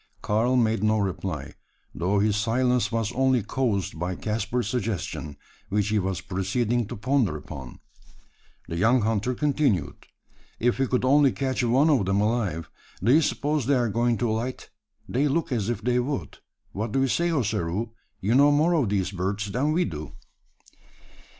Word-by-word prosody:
Karl 115 Hz, +5 st, +1 dB
made 115 Hz, -4 st, +2 dB
no 110 Hz, 0 st, +3 dB
reply; 90 Hz, -7 st, -3 dB, 0.4 s
though 95 Hz, +4 st, 0 dB
his 105 Hz, +1 st, +2 dB
silence 120 Hz, +1 st, +1 dB
was 115 Hz, -1 st, -1 dB
only 130 Hz, -2 st, +2 dB
caused 100 Hz, -7 st, -1 dB
by 90 Hz, +2 st, -2 dB
Caspar's 110 Hz, +3 st, -2 dB
suggestion 105 Hz, -, -3 dB, 0.3 s
which 105 Hz, +1 st, 0 dB
he 105 Hz, 0 st, +2 dB
was 95 Hz, -1 st, -2 dB
proceeding 110 Hz, +5 st, -1 dB
to 120 Hz, -, -6 dB
ponder 115 Hz, -, +1 dB
upon. 70 Hz, -4 st, -9 dB, 0.9 s
The 85 Hz, -, -4 dB
young 115 Hz, +7 st, +3 dB
hunter 110 Hz, +3 st, 0 dB
continued: 140 Hz, -, 0 dB, 0.5 s
"If 120 Hz, +2 st, +1 dB
we 135 Hz, -, +2 dB
could 125 Hz, 0 st, 0 dB
only 140 Hz, 0 st, +5 dB
catch 130 Hz, -2 st, -1 dB
one 130 Hz, +7 st, +4 dB
of 125 Hz, -10 st, +2 dB
them 95 Hz, +1 st, +2 dB
alive! 105 Hz, -7 st, 0 dB, 0.4 s
Do 120 Hz, +5 st, +4 dB
you 160 Hz, -, +6 dB
suppose 145 Hz, -3 st, -1 dB
they 140 Hz, -, +4 dB
are 120 Hz, -3 st, +1 dB
going 120 Hz, +2 st, +1 dB
to 115 Hz, +2 st, 0 dB
alight? 120 Hz, +4 st, -4 dB, 0.4 s
They 140 Hz, +6 st, +1 dB
look 145 Hz, +1 st, -1 dB
as 115 Hz, -4 st, -1 dB
if 115 Hz, -3 st, -3 dB
they 125 Hz, +1 st, +2 dB
would. 135 Hz, +3 st, -3 dB, 0.3 s
What 110 Hz, +2 st, -4 dB
do 135 Hz, -, +2 dB
you 135 Hz, -, +3 dB
say, 170 Hz, +6 st, +1 dB
Ossaroo? 110 Hz, -, -1 dB, 0.3 s
You 105 Hz, +5 st, +1 dB
know 140 Hz, +3 st, +6 dB
more 155 Hz, +4 st, +3 dB
of 145 Hz, -11 st, +2 dB
these 95 Hz, -2 st, 0 dB
birds 100 Hz, +2 st, -2 dB
than 140 Hz, +8 st, 0 dB
we 175 Hz, +3 st, +2 dB
do." 75 Hz, -3 st, -6 dB
115 Hz, 170 wpm, -25 LUFS, 100-130 Hz, 0.9 s, you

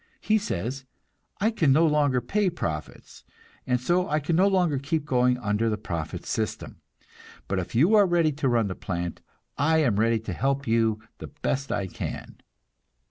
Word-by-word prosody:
He 220 Hz, 0 st, +2 dB
says: 130 Hz, -, -4 dB, 0.6 s
"I 215 Hz, +3 st, +2 dB
can 160 Hz, -11 st, +2 dB
no 160 Hz, +5 st, +5 dB
longer 145 Hz, -5 st, +2 dB
pay 195 Hz, -, +1 dB
profits, 80 Hz, -, -6 dB, 0.4 s
and 125 Hz, -1 st, +2 dB
so 175 Hz, +8 st, +1 dB
I 150 Hz, +1 st, +1 dB
can 155 Hz, +3 st, -1 dB
no 190 Hz, +4 st, +4 dB
longer 180 Hz, -8 st, +2 dB
keep 145 Hz, +2 st, -2 dB
going 125 Hz, -2 st, +2 dB
under 110 Hz, -1 st, 0 dB
the 105 Hz, -, -1 dB
profit 85 Hz, -7 st, -5 dB
system; -, -, -4 dB, 0.7 s
but 95 Hz, 0 st, -1 dB
if 90 Hz, +4 st, -6 dB
you 160 Hz, -, +4 dB
are 205 Hz, -2 st, +6 dB
ready 170 Hz, -3 st, +2 dB
to 140 Hz, -2 st, -1 dB
run 115 Hz, -3 st, +2 dB
the 95 Hz, -, -3 dB
plant, 85 Hz, -2 st, -4 dB, 0.4 s
I 160 Hz, +3 st, +3 dB
am 105 Hz, -7 st, +1 dB
ready 115 Hz, +1 st, +3 dB
to 105 Hz, -4 st, -5 dB
help 140 Hz, +7 st, -1 dB
you 115 Hz, -1 st, +1 dB, 0.2 s
the -, -, -7 dB
best 140 Hz, -2 st, -3 dB
I 100 Hz, -, -1 dB
can." 95 Hz, -, -6 dB
135 Hz, 180 wpm, -26 LUFS, 110-160 Hz, 0.7 s, are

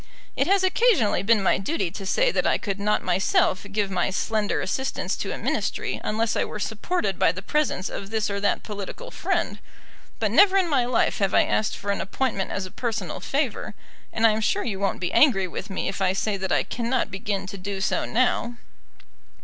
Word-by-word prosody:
It 275 Hz, -, +1 dB
has 390 Hz, 0 st, +3 dB
occasionally 375 Hz, -, +3 dB
been 210 Hz, 0 st, +3 dB
my -, -, +3 dB
duty 195 Hz, -, -1 dB
to 195 Hz, +1 st, -7 dB
say -, -, +3 dB
that -, -, +1 dB
I -, -, +3 dB
could 200 Hz, -2 st, -4 dB
not 210 Hz, +1 st, +1 dB
myself 185 Hz, +1 st, +1 dB
give 200 Hz, -1 st, 0 dB
my 180 Hz, -1 st, +1 dB
slender 205 Hz, +3 st, 0 dB
assistance 265 Hz, +8 st, -2 dB
to -, -, -3 dB
a -, -, -4 dB
Ministry -, -, -2 dB
unless 225 Hz, +1 st, 0 dB
I -, -, +2 dB
were -, -, -5 dB
supported 210 Hz, -, -2 dB
by -, -, +4 dB
the 185 Hz, +2 st, -8 dB
presence 290 Hz, -8 st, 0 dB
of 195 Hz, -, -6 dB
this 220 Hz, -1 st, 0 dB
or 200 Hz, 0 st, -2 dB
that 200 Hz, 0 st, 0 dB
political 210 Hz, -, -7 dB
friend. -, -, -1 dB, 0.6 s
But -, -, 0 dB
never 390 Hz, -1 st, +6 dB
in 375 Hz, -2 st, +3 dB
my 270 Hz, -6 st, +2 dB
life 245 Hz, -1 st, +1 dB
have 195 Hz, -2 st, +1 dB
I -, -, +6 dB
asked 215 Hz, -, 0 dB
for 200 Hz, -, -2 dB
an 200 Hz, -, -1 dB
appointment 195 Hz, -2 st, -2 dB
as 195 Hz, -, -3 dB
a 185 Hz, -, -10 dB
personal 230 Hz, -1 st, -3 dB
favour; -, -, -2 dB, 0.4 s
and 225 Hz, -, +1 dB
I 225 Hz, -, +7 dB
am 215 Hz, +1 st, -1 dB
sure 205 Hz, -, +1 dB
you 200 Hz, -5 st, -3 dB
won't 200 Hz, 0 st, -1 dB
be 180 Hz, -1 st, -3 dB
angry 195 Hz, -11 st, +5 dB
with 190 Hz, +3 st, -6 dB
me 190 Hz, -, -3 dB
if 200 Hz, -, -4 dB
I 185 Hz, -1 st, +3 dB
say 205 Hz, +2 st, -1 dB
that 190 Hz, -1 st, -3 dB
I -, -, +3 dB
cannot 240 Hz, +2 st, -1 dB
begin 195 Hz, 0 st, -3 dB
to 195 Hz, +1 st, -7 dB
do 195 Hz, +1 st, -4 dB
so 190 Hz, -, 0 dB
now." 240 Hz, 0 st, +1 dB
210 Hz, 215 wpm, -25 LUFS, 195-240 Hz, 0.6 s, I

